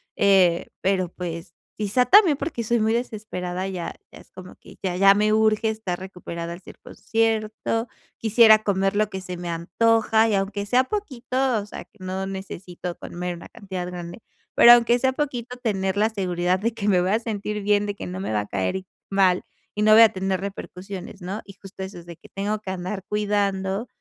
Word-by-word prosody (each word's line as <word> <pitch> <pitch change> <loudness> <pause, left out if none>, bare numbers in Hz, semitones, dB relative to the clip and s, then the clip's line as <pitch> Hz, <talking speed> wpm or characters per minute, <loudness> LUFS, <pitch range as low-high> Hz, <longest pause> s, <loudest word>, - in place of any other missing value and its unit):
eh, 185 -4 +4
pero, 185 -2 +1
pues, 170 -1 -7 0.2
quizá 215 +4 +1
también 380 -6 +7
porque 275 -5 -3
soy 235 +2 +1
muy 220 +1 +2
desesperada, 200 -6 -3
ya 180 -3 -5 0.2
ya - - -13
es - - -19
como 185 0 -11
que - - -16
ya 185 -2 -1
ya 195 +1 +7
me 210 +1 +2
urge 220 0 +3
estar 215 -5 -4
recuperada 170 -2 -7
al 175 - -11
100% 225 +3 -2 0.3
quisiera 220 0 +6
comer 195 -1 +1
lo 215 -1 +2
que 190 - -5
se 180 -1 -6
me 175 0 -5
antoja 225 +6 +2
y, - - 0
aunque 200 +1 -2
sea 250 +5 +3
poquito, 260 - -1
o 200 - -6
sea, - - -8
que 215 - -29
no 190 +1 -3
necesito 180 -2 -7
comer 180 0 -5
una 170 - -12
cantidad 190 -5 -6
grande, 175 0 -7 0.4
pero 240 - +9
aunque 240 0 +4
sea 260 +1 +1
poquito, 250 -4 -3
tener 195 -5 -1
la 215 +2 +3
seguridad 180 -3 -1
de 230 +3 -1
que 210 -2 -4
me 185 -3 +4
voy 185 +2 0
a 220 - +2
sentir 210 -2 -4
bien, 205 0 +2
de 205 -1 -3
que - - -7
no 180 +1 -5
me 190 - -3
va 105 - +1
a 105 - -8
caer 100 - -2 0.3
mal, 190 -2 +3 0.3
y 210 - 0
no 215 0 +6
voy 220 - +9
a 225 - +7
tener 190 0 -2
repercusiones, 195 -1 -7
¿no? 190 +5 -5
Y 195 - -12
justo 195 0 -12
eso 190 0 -8
es 170 - -14
de 170 -2 -10
que - - -17
tengo 205 +2 -2
que 205 - -8
andar 185 +1 -5
cuidando 205 0 -1
200 Hz, 200 wpm, -24 LUFS, 185-220 Hz, 0.4 s, pero